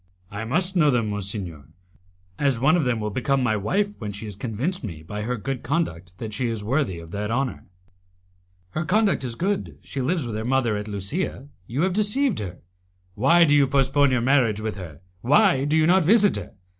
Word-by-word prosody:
"I 105 +2 -5
must 180 +10 0
know 155 -4 +4
them, 115 -5 +1
monsignor, 100 - -4 0.7
as 140 -5 +2
one 150 +6 +4
of 170 -5 +1
them 120 -2 0
will 105 0 -3
become 130 +4 0
my 110 -3 +2
wife 195 - 0
when 105 -3 -4
she 100 +2 -7
has 105 -3 -7
convinced 125 - -3
me 80 -8 -7
by 105 +6 -5
her 125 +3 -2
good 135 +3 -4
conduct 95 - -3
that 110 +2 -6
she 125 +3 -1
is 115 -3 -3
worthy 120 - 0
of 85 0 -10
that 105 +1 -3
honour." 130 +3 -2 1.1
"Her 155 - -2
conduct 200 -1 +2
is 120 -3 -4
good, 195 - -2
she 135 - -5
lives 155 +2 0
with 115 -3 -4
her 110 - -3
mother 120 -2 +1
at 105 +1 -4
Lusia; 115 - -4 0.2
you 135 +8 -1
have 185 0 +1
deceived 215 +4 +1
her. 90 -4 -6 0.5
Why 140 - +5
do 150 -3 +4
you 145 -2 +5
postpone 140 +1 +3
your 125 -2 +1
marriage 125 -5 +3
with 110 0 -3
her? 85 -5 -9 0.2
Why 145 - +4
do 150 +2 +2
you 155 - +4
not 180 +2 +4
visit 205 +4 +4
her? - - -7
125 Hz, 205 wpm, -24 LUFS, 105-155 Hz, 1.1 s, Why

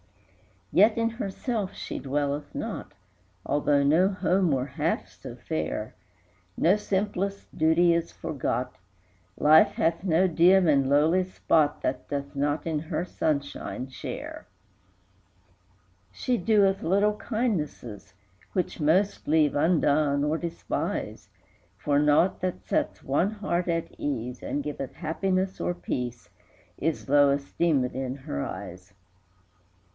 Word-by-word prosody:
III. - - +3
Yet 215 +2 +6
in 230 0 +2
herself 215 -1 -3
she - - -5
dwelleth 145 +1 -2
not, - - -5 0.5
Although 145 0 +2
no 160 +7 +4
home 185 -2 +1
were 130 -3 +1
half 135 - -2
so - - -11
fair; 80 +7 -4 0.6
No 175 +5 +4
simplest 200 -1 -2
duty 165 +2 +4
is 170 0 -1
forgot, 130 -5 -3 0.6
Life 155 +2 +6
hath 165 +2 0
no 185 0 +3
dim 180 +2 +5
and 140 -3 +3
lowly 155 +6 +4
spot 160 -5 +1
That - - -2
doth 140 0 -4
not 145 +2 -1
in 160 -2 -1
her 160 +2 -3
sunshine 140 -5 -3
share. 130 - -7 1.7
IV. - - -23
She 250 -1 0
doeth 195 -1 +3
little 205 +4 +2
kindnesses, 155 - -3 0.4
Which 180 -2 -2
most 175 +7 +1
leave 150 -1 +3
undone, 145 -2 +2
or 150 +2 +1
despise; 170 -1 -4 0.5
For 140 +9 +1
naught 150 +5 +3
that 185 -1 -3
sets - - -1
one 145 +8 +1
heart 200 -5 -2
at 165 -1 -2
ease, 125 -3 -3
And 145 - -3
giveth 135 -3 -5
happiness 185 +4 -1
or 175 - 0
peace, 125 -8 -5 0.5
Is 160 0 -2
low 145 -1 +5
esteemèd 140 -2 0
in 130 0 -3
her 100 - -5
eyes. 90 +1 -7
V. - - -31
160 Hz, 130 wpm, -27 LUFS, 140-185 Hz, 1.7 s, Yet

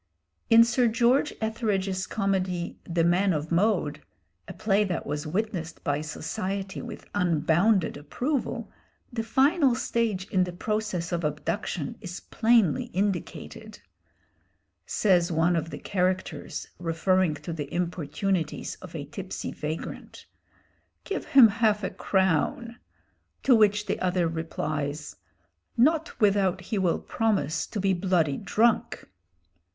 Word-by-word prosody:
In 230 0 +8
Sir 240 +1 +2
George 240 +6 +3
Etheredge's 200 -4 -1
comedy, 190 -4 -1
'The 170 -1 0
Man 180 +3 +3
of 155 +1 -3
Mode,' 170 -5 +1 0.5
a - - -7
play 210 -1 +2
that 185 -4 -3
was 150 +2 -3
witnessed 180 -2 -3
by 145 -1 0
society 190 +5 -4
with - - -8
unbounded 175 +1 +2
approval, 245 - -3 0.4
the 230 - -1
final 265 +4 +3
stage 225 -6 -1
in 185 -2 +3
the 180 -1 -4
process 210 -2 -2
of 170 -1 -1
abduction 150 +2 -3
is 180 0 -6
plainly 225 -8 +2
indicated. 195 0 -4 1.1
Says 180 -4 +2
one 165 +2 +2
of 165 0 -1
the - - -6
characters, 185 -1 -2
referring 175 0 +1
to 150 +3 -6
the 145 -3 -5
importunities 175 0 -2
of 180 -3 -10
a 145 -3 -4
tipsy 185 +6 -6
vagrant, 155 +2 -6 0.8
"Give 395 - -4
him 265 -4 +8
half 215 -1 +1
a 190 - -2
crown!" 190 +5 0 0.7
to 270 - +5
which 210 -1 +3
the - - -2
other 180 -2 +1
replies, 155 -2 -4 0.6
"Not 320 +7 +2
without 195 -3 +3
he 205 +3 -2
will 180 -3 +2
promise 200 -9 -1
to 215 - -4
be 195 0 +2
bloody 175 -6 +1
drunk!" 220 +4 +1
185 Hz, 125 wpm, -27 LUFS, 165-215 Hz, 1.1 s, In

